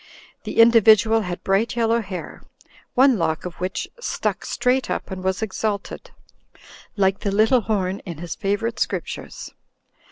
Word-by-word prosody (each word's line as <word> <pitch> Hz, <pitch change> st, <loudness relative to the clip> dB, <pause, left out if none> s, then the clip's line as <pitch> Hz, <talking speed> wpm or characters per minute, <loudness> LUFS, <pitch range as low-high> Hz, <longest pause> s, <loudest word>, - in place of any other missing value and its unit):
The -, -, -6 dB
individual 225 Hz, -1 st, +6 dB
had 180 Hz, -3 st, -5 dB
bright 195 Hz, +5 st, +1 dB
yellow 230 Hz, 0 st, +2 dB
hair, 190 Hz, -4 st, -7 dB, 0.5 s
one 260 Hz, -3 st, +5 dB
lock 160 Hz, 0 st, -1 dB
of 180 Hz, -, -5 dB
which 185 Hz, +1 st, -3 dB
stuck -, -, -3 dB
straight 255 Hz, +1 st, 0 dB
up -, -, -4 dB
and 185 Hz, -1 st, -6 dB
was 190 Hz, +3 st, -1 dB
exalted, 205 Hz, -1 st, -4 dB, 0.9 s
like 195 Hz, -1 st, +1 dB
the 200 Hz, -, -2 dB
little 220 Hz, +5 st, +3 dB
horn 195 Hz, -3 st, -1 dB
in 170 Hz, -5 st, -8 dB
his 170 Hz, 0 st, -5 dB
favorite 225 Hz, +4 st, -2 dB
scriptures. -, -, -4 dB
205 Hz, 140 wpm, -22 LUFS, 190-230 Hz, 0.9 s, individual